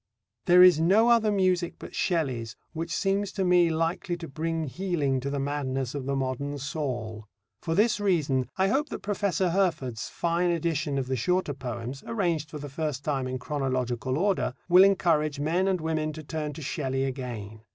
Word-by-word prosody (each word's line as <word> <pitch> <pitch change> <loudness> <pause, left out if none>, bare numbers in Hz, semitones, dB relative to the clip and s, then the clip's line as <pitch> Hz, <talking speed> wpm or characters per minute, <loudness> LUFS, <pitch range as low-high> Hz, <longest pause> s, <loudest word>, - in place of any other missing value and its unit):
There 180 +1 +8
is 180 -4 +7
no 200 +8 +4
other 225 -3 +4
music 185 -3 +1
but - - -10
Shelley's 130 - -1 0.2
which 165 +1 -4
seems 195 +3 0
to 195 -2 -1
me 180 -1 +5
likely 165 +2 -1
to 170 -1 -7
bring 160 +3 -2
healing 150 -3 -1
to 135 +2 -3
the 140 - -2
madness 135 -2 -2
of 140 -2 -5
the 140 - 0
modern 135 +2 -2
Saul. 125 -7 -4 0.3
For 165 - -2
this 210 +3 +3
reason 145 - +1
I 190 0 +3
hope 280 +8 +1
that - - -6
Professor 195 -3 0
Herford's 160 - -1
fine 170 +1 0
edition 155 -4 -1
of 135 - -1
the 130 +1 -1
shorter 180 +5 0
poems 125 0 -6
(arranged 170 -9 -1
for 150 - -7
the 145 0 -7
first 145 -1 -4
time 135 -4 -1
in 130 0 -3
chronological 130 -2 -2
order) 195 +3 0
will 180 +1 +8
encourage 160 -7 +2
men 170 +6 +1
and 190 -2 +1
women 155 -1 -1
to 155 +1 -8
turn 150 0 -4
to 155 +1 -8
Shelley 135 -2 -2
again. 120 -6 -5
155 Hz, 185 wpm, -27 LUFS, 135-180 Hz, 0.3 s, There